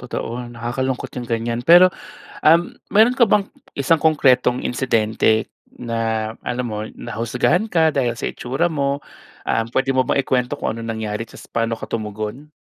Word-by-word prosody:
totoo. 120 0 -5
Nakakalungkot 120 +2 -3
yung 120 - -8
ganyan. 115 0 -1
Pero, 175 +6 +7 0.5
um, 165 +3 +4 0.2
meron 225 +5 +5
ka 245 - +6
bang 205 -2 +2 0.2
isang 140 +4 +2
konkretong 130 -5 +3
insidente 110 -3 +1 0.2
na, 115 -2 -2
alam 125 0 -2
mo, 105 0 -4
nahusgahan 120 - 0
ka 160 -2 +4
dahil 130 -6 0
sa - - -2
itsura 135 +8 -1
mo, 140 -2 -1 0.5
um, 115 - +1
pwede 135 +1 +1
mo 130 - +4
bang 140 - +1
ikwento 125 -2 0
kung 110 - -2
anong 115 0 -5
nangyari 110 0 -4
tapos - - -14
paano 115 0 -1
ka - - -8
tumugon? 110 +6 -5
125 Hz, 155 wpm, -20 LUFS, 115-140 Hz, 0.5 s, Pero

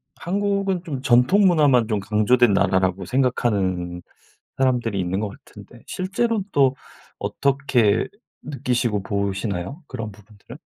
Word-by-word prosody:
한국은 195 0 -1
좀 145 -7 -5
전통 125 +11 +4
문화만 145 - +4
좀 110 -2 0
강조된 110 +3 +3
나라라고 95 -1 +1
생각하는 95 -8 0 0.6
사람들이 120 -6 +1
있는 90 +1 -1
것 105 -1 -2
같은데 - - -15
실제로는 205 +3 -1
또 135 -4 +3 0.4
어떻게 135 -6 +1 0.4
느끼시고 125 -6 -1
보시나요? 100 - -3
그런 110 -1 -6
부분들은? 105 0 -15
120 Hz, 295 characters per minute, -22 LUFS, 100-140 Hz, 0.6 s, 전통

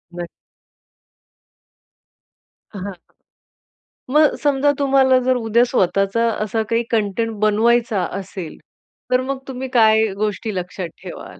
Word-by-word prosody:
नक्क. 175 -1 -5 2.4
हां, 200 -3 -7
हां. 200 - -5 1.2
मग 300 0 +4
समजा 285 0 +3
तुम्हाला 270 -2 +4
जर 255 0 +3
उद्या 235 0 +2
स्वतःचा 195 0 +1 0.2
असा 220 +1 -1
काही 230 +1 +1
कंटेंट 225 0 0
बनवायचा 220 0 +2 0.2
असेल, 185 -4 -8 0.5
तर 250 - +3
मग 265 +1 -3
तुम्ही 265 0 -5
काय 220 -2 +5 0.2
गोष्टी 215 0 -2
लक्षात 180 0 -4
ठेवाल? - - -10
225 Hz, 110 wpm, -20 LUFS, 200-255 Hz, 2.4 s, काय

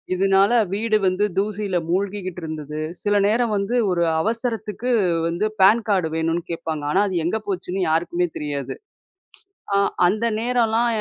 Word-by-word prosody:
இதுனால, 195 +3 +3 0.2
வீடு 215 +1 +1
வந்து 185 +3 +1
தூசியில 205 -2 -1
மூழ்கிகிட்டு 185 -1 -2
இருந்தது. 155 -1 -5 0.2
சில 205 0 +1
நேரம் 225 0 +1
வந்து 200 +5 -1 0.2
ஒரு 170 -1 +1 0.2
அவசரத்துக்கு 230 +1 -3 0.4
வந்து 170 +5 -1 0.2
பேன் 215 +4 +6
காடு 185 -5 +2
வேணும்னு 165 +1 -1
கேப்பாங்க. 160 -2 -4
ஆனா, 190 +5 +3
அது 185 - -4
எங்க 180 +6 0
போச்சுன்னு 185 -1 -3
யாருக்குமே 175 +2 0
தெரியாது. 145 -3 -4 1.0
அ - - +3 0.3
அந்த 215 +6 +1
நேரல்லாம் 235 -1 +1
195 Hz, 135 wpm, -22 LUFS, 175-215 Hz, 1.0 s, பேன்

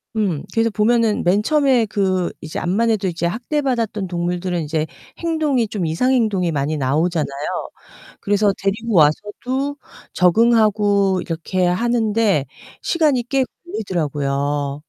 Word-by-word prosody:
음. 190 -9 -1
그래서 230 0 +2
보면은 220 0 +2
맨 195 +4 +2
처음에 275 -6 +3
그 190 -3 0
이제 155 - -6
암만해도 205 +2 +1
이제 170 -1 -1
학대받았던 235 - -2
동물들은 175 0 -2
이제 155 +1 -2 0.3
행동이 305 -8 0
좀 200 -5 -3
이상 170 +12 +1
행동이 205 -9 +1
많이 150 +1 -1
나오잖아요. 155 +4 0 0.9
그래서 205 0 +2
데리고 215 +2 -2
와서도 245 - +1 0.4
적응하고 205 -1 +3
이렇게 175 +2 -2
하는데 215 - +1 0.4
시간이 300 -7 +1
꽤 270 -1 +2 0.2
걸리더라고요. 145 - -2
200 Hz, 305 characters per minute, -20 LUFS, 170-230 Hz, 0.9 s, 처음에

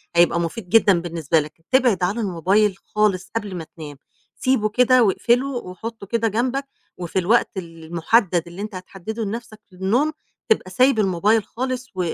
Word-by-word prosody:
هيبقى 170 0 +4
مُفيد 175 +3 -4
جدًا 200 -5 +5
بالنسبة 165 -2 0
لك. 155 +2 -8
تبعد 245 -8 +3
عن 180 +3 +1
الmobile 200 0 +1 0.2
خالص 210 -3 +1
قبل 205 -4 -3
ما 170 - -5
تنام، 150 -3 -8 0.4
سيبه 255 -5 +1
كده 250 +2 +4
واقفله 240 +5 +2
وحُطّه 225 -3 -6
كده 230 +2 0
جنبك 250 +6 -1 0.3
وفي 180 +1 -2
الوقت 215 +7 +3
المُحدَّد 170 +2 0
اللي 175 +3 -8
أنت 210 -1 -6
هتحدِّده 195 +4 -6
لنَفْسك 220 +1 -6
للنوم 205 +12 +1 0.4
تبقى 425 - +1
سايب 255 0 +3
الmobile 205 +3 +2
خالص 255 +2 -4
و 180 -3 -1
205 Hz, 155 wpm, -22 LUFS, 175-235 Hz, 0.4 s, جدًا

